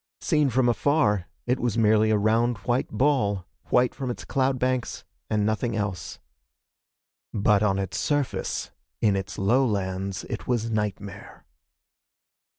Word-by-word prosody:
Seen 150 Hz, -4 st, +2 dB
from 125 Hz, 0 st, +2 dB
afar, 120 Hz, -, +2 dB, 0.2 s
it 125 Hz, +1 st, +1 dB
was 120 Hz, -2 st, -1 dB
merely 110 Hz, -1 st, +4 dB
a 110 Hz, -, +3 dB
round 115 Hz, +3 st, +2 dB
white 120 Hz, +1 st, +1 dB
ball 105 Hz, -6 st, +1 dB, 0.2 s
white 125 Hz, 0 st, +2 dB
from 130 Hz, -3 st, -4 dB
its 120 Hz, -, -5 dB
cloud 135 Hz, -1 st, +1 dB
banks 130 Hz, -1 st, -1 dB, 0.3 s
and 105 Hz, -1 st, +1 dB
nothing 110 Hz, +2 st, 0 dB
else. 100 Hz, -7 st, -3 dB, 1.1 s
But 105 Hz, -1 st, +3 dB
on 100 Hz, -3 st, +2 dB
its 95 Hz, -1 st, -3 dB
surface, 145 Hz, -3 st, -1 dB, 0.3 s
in 105 Hz, -3 st, +3 dB
its 95 Hz, 0 st, -4 dB
lowlands 100 Hz, -4 st, 0 dB
it -, -, -6 dB
was 115 Hz, -2 st, 0 dB
nightmare. 105 Hz, -2 st, -4 dB
110 Hz, 135 wpm, -25 LUFS, 100-125 Hz, 1.1 s, merely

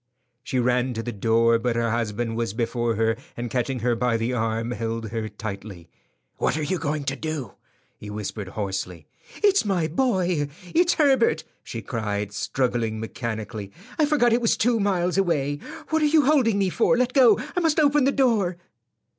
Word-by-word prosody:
She 130 Hz, -, -2 dB
ran 125 Hz, 0 st, +1 dB
to 115 Hz, -, -3 dB
the 120 Hz, -, -3 dB
door, 115 Hz, +2 st, +3 dB
but 120 Hz, 0 st, -1 dB
her 115 Hz, -1 st, 0 dB
husband 115 Hz, 0 st, -2 dB
was 115 Hz, -3 st, -2 dB
before 120 Hz, -1 st, -1 dB
her, 115 Hz, +1 st, +1 dB, 0.2 s
and 120 Hz, -1 st, -4 dB
catching 125 Hz, 0 st, -1 dB
her 120 Hz, 0 st, +1 dB
by 120 Hz, 0 st, +1 dB
the 115 Hz, +3 st, -1 dB
arm, 115 Hz, 0 st, -1 dB
held 115 Hz, -1 st, -3 dB
her 110 Hz, -1 st, -3 dB
tightly. 100 Hz, -5 st, -8 dB, 0.5 s
"What -, -, 0 dB
are 155 Hz, -, -2 dB
you 185 Hz, +4 st, -1 dB
going 150 Hz, -1 st, -2 dB
to 140 Hz, 0 st, -2 dB
do?" 145 Hz, -6 st, -4 dB, 0.5 s
he 105 Hz, -, -8 dB
whispered 105 Hz, -1 st, -5 dB
hoarsely. 95 Hz, -5 st, -4 dB, 0.4 s
"It's 405 Hz, -1 st, +5 dB
my 190 Hz, -5 st, 0 dB
boy; 180 Hz, -, +1 dB, 0.3 s
it's 345 Hz, +1 st, +4 dB
Herbert!" 265 Hz, -, +3 dB, 0.2 s
she 115 Hz, -1 st, -6 dB
cried, 105 Hz, -3 st, -3 dB
struggling 115 Hz, -1 st, -1 dB
mechanically. 110 Hz, -3 st, -5 dB, 0.3 s
"I 305 Hz, -, +4 dB
forgot 245 Hz, -6 st, +3 dB
it 240 Hz, -, +2 dB
was 230 Hz, -, +2 dB
two 235 Hz, 0 st, +2 dB
miles 185 Hz, -2 st, +1 dB
away. 145 Hz, -6 st, +1 dB, 0.3 s
What 315 Hz, 0 st, +2 dB
are -, -, +4 dB
you 300 Hz, -1 st, +4 dB
holding 260 Hz, -8 st, +3 dB
me 195 Hz, -2 st, +1 dB
for? 240 Hz, +4 st, +3 dB
Let 250 Hz, 0 st, +1 dB
go. 250 Hz, -6 st, +6 dB, 0.2 s
I -, -, +2 dB
must 325 Hz, -3 st, +2 dB
open 290 Hz, -2 st, +4 dB
the 275 Hz, -, +4 dB
door." 220 Hz, -11 st, +2 dB
125 Hz, 180 wpm, -24 LUFS, -, 0.5 s, go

